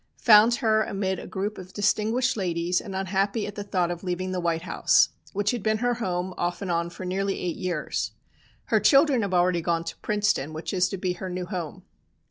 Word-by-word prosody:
Found 225 Hz, +1 st, +7 dB
her 220 Hz, -2 st, +2 dB
amid 195 Hz, -2 st, -2 dB
a -, -, -8 dB
group 200 Hz, +2 st, -4 dB
of 185 Hz, 0 st, -11 dB
distinguished 220 Hz, +5 st, +1 dB
ladies, 175 Hz, -3 st, 0 dB
and 195 Hz, -, -7 dB
unhappy 195 Hz, +3 st, 0 dB
at 205 Hz, -, -6 dB
the 205 Hz, -, -5 dB
thought 180 Hz, -3 st, 0 dB
of 175 Hz, +1 st, -6 dB
leaving 185 Hz, 0 st, -2 dB
the 185 Hz, -, -2 dB
White 170 Hz, -1 st, -1 dB
House, -, -, +3 dB, 0.2 s
which 205 Hz, +1 st, 0 dB
had 240 Hz, -3 st, -3 dB
been 215 Hz, +1 st, +1 dB
her 245 Hz, +2 st, +1 dB
home 185 Hz, -5 st, -2 dB
off 175 Hz, 0 st, -1 dB
and 185 Hz, -, -2 dB
on 170 Hz, 0 st, 0 dB
for 175 Hz, +2 st, -8 dB
nearly 195 Hz, +2 st, -1 dB
eight 175 Hz, -2 st, -2 dB
years. 175 Hz, -5 st, -2 dB, 0.6 s
Her -, -, +6 dB
children 275 Hz, -3 st, +5 dB
have 195 Hz, -3 st, -1 dB
already 175 Hz, -1 st, +3 dB
gone 165 Hz, 0 st, 0 dB
to -, -, -6 dB
Princeton, 205 Hz, -8 st, 0 dB
which 160 Hz, +5 st, -5 dB
is 185 Hz, -1 st, +2 dB
to 195 Hz, -, -4 dB
be 180 Hz, -1 st, -1 dB
her 185 Hz, +1 st, -6 dB
new 180 Hz, 0 st, -4 dB
home. 175 Hz, -4 st, -6 dB
190 Hz, 215 wpm, -26 LUFS, 175-210 Hz, 0.6 s, Found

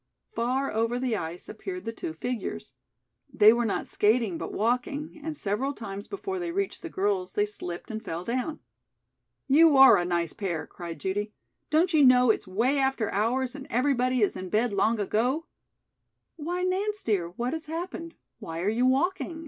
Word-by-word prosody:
Far 260 Hz, -, -1 dB
over 230 Hz, +2 st, 0 dB
the 250 Hz, -2 st, 0 dB
ice 170 Hz, -2 st, -5 dB
appeared 365 Hz, -, -7 dB
the 225 Hz, -, -2 dB
two 160 Hz, -, -5 dB
figures. 160 Hz, -, -5 dB, 0.6 s
They 215 Hz, +1 st, +7 dB
were 240 Hz, 0 st, 0 dB
not 200 Hz, -, -1 dB
skating 215 Hz, -3 st, +2 dB
but -, -, -5 dB
walking, 250 Hz, +7 st, -1 dB
and 315 Hz, -1 st, -4 dB
several 245 Hz, +7 st, -1 dB
times 200 Hz, -5 st, -7 dB
before 385 Hz, -1 st, -4 dB
they 345 Hz, -1 st, -3 dB
reached 395 Hz, +2 st, -2 dB
the 335 Hz, -, -6 dB
girls 190 Hz, -, -1 dB
they 205 Hz, -, +2 dB
slipped 190 Hz, 0 st, -7 dB
and 220 Hz, 0 st, -5 dB
fell 165 Hz, +2 st, -4 dB
down. 255 Hz, -, -3 dB, 0.8 s
"You 300 Hz, +1 st, +6 dB
are 265 Hz, 0 st, +9 dB
a 175 Hz, -, +1 dB
nice 170 Hz, -2 st, -1 dB
pair," 180 Hz, -7 st, -3 dB
cried 170 Hz, -3 st, -8 dB
Judy. 205 Hz, +5 st, -2 dB, 0.4 s
"Don't 330 Hz, +3 st, +3 dB
you 305 Hz, -2 st, +5 dB
know 250 Hz, -2 st, +6 dB
it's 215 Hz, -, -3 dB
way 240 Hz, +9 st, +1 dB
after 265 Hz, -5 st, 0 dB
hours 245 Hz, +5 st, 0 dB
and 280 Hz, 0 st, -9 dB
everybody 255 Hz, -1 st, +1 dB
is 205 Hz, -, +2 dB
in 185 Hz, 0 st, -6 dB
bed 220 Hz, +3 st, +1 dB
long 215 Hz, +3 st, +2 dB
ago?" 245 Hz, +10 st, 0 dB, 0.9 s
"Why, 345 Hz, +3 st, -3 dB
Nance, 400 Hz, +3 st, -1 dB
dear, 190 Hz, -6 st, 0 dB
what 240 Hz, +8 st, -3 dB
has 320 Hz, -1 st, -5 dB
happened? 335 Hz, +1 st, -5 dB, 0.2 s
Why 165 Hz, 0 st, -5 dB
are 190 Hz, -, +1 dB
you 240 Hz, +4 st, +2 dB
walking?" 325 Hz, +4 st, 0 dB
245 Hz, 180 wpm, -27 LUFS, 205-295 Hz, 0.9 s, are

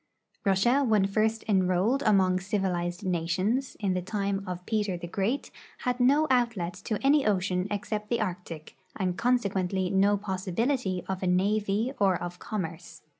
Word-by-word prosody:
Russia 230 Hz, +8 st, +3 dB
when 215 Hz, -6 st, +3 dB
first 220 Hz, +3 st, 0 dB
enrolled 190 Hz, +6 st, +2 dB
among 190 Hz, -3 st, +4 dB
civilized 185 Hz, -2 st, -2 dB
nations, 185 Hz, +9 st, -1 dB
in 200 Hz, -3 st, 0 dB
the 180 Hz, -, -1 dB
time 200 Hz, 0 st, -2 dB
of 180 Hz, 0 st, -5 dB
Peter 210 Hz, -4 st, -1 dB
the 175 Hz, -, -7 dB
Great, 200 Hz, +9 st, -2 dB, 0.3 s
had 250 Hz, 0 st, 0 dB
no 280 Hz, +5 st, +4 dB
outlet 235 Hz, -9 st, +1 dB
to 210 Hz, +4 st, -3 dB
any 285 Hz, +1 st, +5 dB
ocean 185 Hz, -2 st, 0 dB
except 210 Hz, +1 st, -3 dB
the 235 Hz, -, +1 dB
Arctic, 175 Hz, -6 st, -5 dB, 0.2 s
and 185 Hz, -3 st, -1 dB
consequently 195 Hz, -6 st, 0 dB
no 200 Hz, +1 st, +3 dB
possibility 190 Hz, +2 st, -1 dB
of 190 Hz, -1 st, -3 dB
a 185 Hz, -, -1 dB
navy 205 Hz, +5 st, +1 dB
or 195 Hz, -2 st, +4 dB
of 175 Hz, 0 st, -6 dB
commerce. 165 Hz, -4 st, -6 dB
195 Hz, 150 wpm, -28 LUFS, 180-220 Hz, 0.3 s, any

